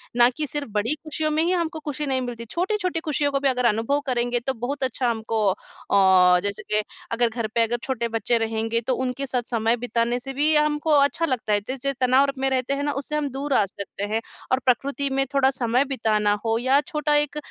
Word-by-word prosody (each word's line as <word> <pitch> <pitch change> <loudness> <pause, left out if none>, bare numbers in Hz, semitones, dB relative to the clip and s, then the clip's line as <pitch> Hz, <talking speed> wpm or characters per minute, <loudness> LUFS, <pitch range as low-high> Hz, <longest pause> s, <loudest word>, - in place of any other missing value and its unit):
ना 240 0 +6
कि 305 -1 -1
सिर्फ़ 290 -2 -4
बड़ी 210 +6 0
खुशियों 310 0 -2
में 310 +1 +2
ही 345 - +1
हमको 335 -3 -1
खुशी 295 0 -3
नहीं 265 -2 0
मिलती, 240 -2 -5
छोटी-छोटी 365 - -1
खुशियों 290 -1 +1
को 275 - +1
भी 275 0 +2
अगर 250 -1 0
अनुभव 230 +6 +2
करेंगे 245 -2 0
तो 265 +3 -2
बहुत 265 +4 -4
अच्छा 255 0 0
हमको 225 0 -2
अ, 185 -2 +3
जैसे 200 0 -3
के, 215 0 +3 0.3
अगर 235 +1 +2
घर 230 -1 -3
पे 230 - +4
अगर 235 +1 0
छोटे 240 -3 -2
बच्चे 230 +1 0
रहेंगे, 225 0 -1
तो 255 +3 -1
उनके 260 +2 -2
साथ 255 -2 -1
समय 230 -1 +1
बिताने 240 0 -1
से 270 +2 -7
भी 295 +3 +2
हमको 300 +1 +1
अच्छा 290 +3 +3
लगता 250 -7 -1
है। 205 - +3
जैस 260 +1 -4
जे 275 0 +1
तनाव 255 +2 +5
र 275 - -2
में 270 0 +1
रहते 260 0 0
हैं 280 +1 -2
ना, 290 - 0
उससे 285 +2 -3
हम 295 -1 -1
दूर 275 +2 -3
आ 210 - +4
सकते 200 0 -8
हैं 225 - +1 0.3
और 260 - +3
प्रकृति 275 +3 +1
में 270 0 0
थोड़ा 270 -1 +4
समय 255 0 +1
बिताना 220 -6 +1
हो 225 0 +2
या 260 +3 +3
छोटा 300 -3 0
एक 295 0 +1
260 Hz, 230 wpm, -24 LUFS, 230-285 Hz, 0.3 s, ना